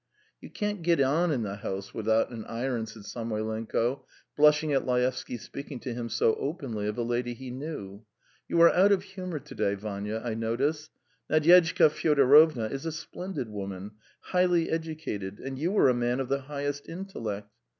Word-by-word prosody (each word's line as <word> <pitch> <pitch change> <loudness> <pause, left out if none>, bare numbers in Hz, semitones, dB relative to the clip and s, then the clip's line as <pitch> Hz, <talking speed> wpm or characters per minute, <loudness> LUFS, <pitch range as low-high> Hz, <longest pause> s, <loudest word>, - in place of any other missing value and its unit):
"You - - -10
can't 210 -3 -3
get 170 -1 +2
on 150 +6 +3
in 125 -6 0
the 100 -1 -4
house 95 -1 -5
without 110 +1 +1
an 115 -2 -6
iron," 120 -1 -2
said 110 -1 -11
Samoylenko, 115 +2 -2 0.3
blushing 150 0 +4
at 135 - +2
Laevsky's 125 -1 -1
speaking 140 -2 -7
to 125 - -4
him 120 0 -4
so 110 - +2
openly 135 - -3
of 105 - -3
a 120 - 0
lady 120 +1 -1
he 130 0 -8
knew. 125 -8 -7 0.4
"You 170 - +1
are 170 - +8
out 195 +3 +5
of 190 -2 +3
humour 185 -4 -6
to 150 +1 -10
day, 100 - 0
Vanya, 105 +1 -4
I 115 - -1
notice. 135 +8 -1 0.4
Nadyezhda 165 0 +6
Fyodorovna 145 -5 +5
is 135 +4 -4
a - - -1
splendid 160 - -6
woman, 100 -1 -6 0.3
highly 180 -2 +2
educated, 155 -12 -4
and 135 0 -6
you 180 +7 0
are - - +6
a 130 - +4
man 120 +1 0
of 135 -1 -3
the 140 0 0
highest 145 +1 -4
intellect. 115 - -6
130 Hz, 175 wpm, -28 LUFS, 110-155 Hz, 0.4 s, are